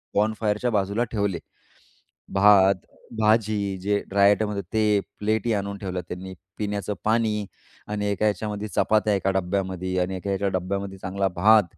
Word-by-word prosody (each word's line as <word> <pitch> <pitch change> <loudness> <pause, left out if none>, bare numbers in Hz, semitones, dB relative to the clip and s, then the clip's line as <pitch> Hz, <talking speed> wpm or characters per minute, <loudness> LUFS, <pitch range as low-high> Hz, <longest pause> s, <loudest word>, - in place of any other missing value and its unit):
बॉनफायरच्या 105 +2 +1
बाजूला 100 +3 +1
ठेवले. 100 -6 -1 0.9
भात, 100 -1 +6 0.4
भाजी 105 -2 +2
जे 100 +1 +1
ड्राय 100 0 +4
आयटम 105 +1 +2
होते 100 -1 -2
ते, 105 -2 +3 0.2
प्लेटही 110 +2 0
आणून 100 0 -3
ठेवलं 95 -2 -4
त्यांनी, 95 +1 -7 0.2
पिण्याचं 105 0 -2
पाणी 110 -2 +1 0.4
आणि 105 -1 -2
एका 105 +2 0
याच्यामध्ये 105 +1 -2
चपात्या 110 0 +2
एका 95 0 +1
डब्यामध्ये 95 -1 -1
आणि 95 +1 -1
एका 95 - -6
ह्याच्या 100 +1 0
डब्यामध्ये 95 +1 -4
चांगला 95 +1 -1
भात. 105 +3 +6
100 Hz, 145 wpm, -25 LUFS, 95-105 Hz, 0.9 s, भात